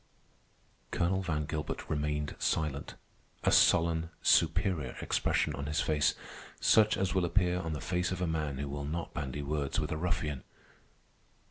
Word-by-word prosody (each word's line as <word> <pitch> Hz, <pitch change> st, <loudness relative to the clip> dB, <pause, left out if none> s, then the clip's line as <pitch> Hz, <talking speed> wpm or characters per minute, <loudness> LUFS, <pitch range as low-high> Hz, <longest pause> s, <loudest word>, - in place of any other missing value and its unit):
Colonel 95 Hz, +2 st, 0 dB
Van 80 Hz, -5 st, -1 dB
Gilbert 75 Hz, 0 st, -4 dB
remained 75 Hz, -1 st, -2 dB
silent, 75 Hz, -3 st, -1 dB, 0.5 s
a -, -, +3 dB
sullen, 80 Hz, 0 st, +4 dB
superior 85 Hz, -3 st, +2 dB
expression -, -, 0 dB
on 70 Hz, 0 st, -5 dB
his 75 Hz, -, 0 dB
face, 75 Hz, -2 st, +2 dB, 0.4 s
such 110 Hz, -1 st, +4 dB
as 95 Hz, -1 st, 0 dB
will 95 Hz, -, +2 dB
appear 90 Hz, 0 st, +2 dB
on 80 Hz, -3 st, -3 dB
the 75 Hz, -, -4 dB
face 90 Hz, 0 st, -1 dB
of 95 Hz, -, -3 dB
a 90 Hz, -, 0 dB
man 80 Hz, -4 st, -2 dB
who 70 Hz, +1 st, -3 dB
will 70 Hz, +1 st, -4 dB
not 80 Hz, +3 st, -4 dB
bandy 70 Hz, -1 st, -4 dB
words 70 Hz, -1 st, -1 dB
with -, -, -2 dB
a 80 Hz, -, -1 dB
ruffian. 75 Hz, -5 st, -2 dB
80 Hz, 155 wpm, -31 LUFS, 75-90 Hz, 0.5 s, sullen